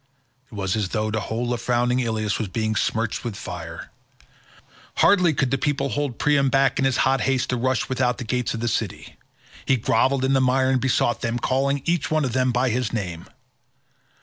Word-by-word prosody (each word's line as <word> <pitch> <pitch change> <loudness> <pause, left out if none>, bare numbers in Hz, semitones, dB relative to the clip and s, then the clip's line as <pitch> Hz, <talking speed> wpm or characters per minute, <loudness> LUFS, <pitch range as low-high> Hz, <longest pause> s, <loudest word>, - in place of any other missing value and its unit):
It - - -10
was 95 -1 -1
as 105 -4 -1
though 110 0 -1
the 110 - -1
whole 120 +3 -2
of 120 - -4
frowning 120 +1 +1
Ilius 110 -3 -1
was 110 - -2
being 110 +3 -2
smirched 110 +1 -1
with 120 -4 -4
fire. 80 -4 -8 1.0
Hardly 180 -4 +4
could 135 -3 0
the 135 - +1
people 140 0 0
hold 145 -4 -2
Priam 140 -2 +2
back 135 0 +2
in 135 - +2
his 135 -2 +1
hot 135 0 +2
haste 130 -1 0
to - - +1
rush 130 0 0
without 125 -2 0
the 130 - -5
gates 125 +1 -2
of 115 - -5
the 120 - -1
city. 110 -3 -3 0.5
He 135 - +2
grovelled 130 +4 +1
in 135 - +2
the 135 - +3
mire 130 +1 +2
and 130 -2 +1
besought 120 -2 +1
them, 120 0 -1
calling 135 +3 0
each 170 -2 0
one 155 -2 +1
of 125 - -3
them 130 0 +2
by 125 +1 +1
his 125 -1 -1
name. 90 -7 -4
125 Hz, 205 wpm, -23 LUFS, 110-135 Hz, 1.0 s, Hardly